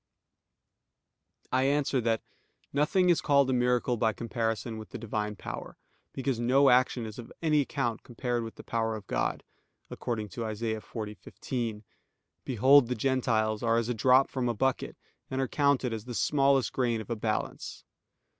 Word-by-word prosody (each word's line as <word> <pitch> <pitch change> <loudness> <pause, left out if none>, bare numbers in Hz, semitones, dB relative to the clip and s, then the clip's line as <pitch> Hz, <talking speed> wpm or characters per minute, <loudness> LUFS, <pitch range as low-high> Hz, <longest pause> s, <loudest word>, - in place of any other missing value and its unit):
I 130 +1 +2
answer 140 -2 +1
that, 115 -1 0 0.5
Nothing 175 +6 +3
is 170 - +2
called 140 -2 +3
a - - +2
miracle 125 0 +1
by 110 0 +2
comparison 115 -1 -3
with 110 - -10
the - - -6
Divine 105 -1 -3
Power; - - -7 0.3
because 135 -3 -2
no 135 +3 +4
action 125 -1 +3
is 110 +2 -8
of 120 - -9
any 155 -2 +4
account 125 -5 -2
compared 120 0 -3
with 115 - -7
the - - -11
power 115 -1 -1
of 105 -2 -8
God, - - -1 0.5
according 110 -3 -3
to 115 +3 -4
Isa. 110 0 -3
40:15: 110 +1 -5 0.6
"Behold 130 +2 +5
the 125 - -1
Gentiles 110 -3 +1
are 115 -1 +2
as 115 0 0
a - - +1
drop 130 +4 +4
from 125 -2 -1
a 120 - -1
bucket, 135 +3 -1 0.3
and 130 - -2
are 135 - +1
counted 140 -3 +1
as 110 -1 -5
the 125 -1 -6
smallest 135 -1 +2
grain 120 -3 +1
of 110 - -7
a - - 0
balance." 110 0 -3
120 Hz, 165 wpm, -29 LUFS, 110-135 Hz, 0.6 s, Behold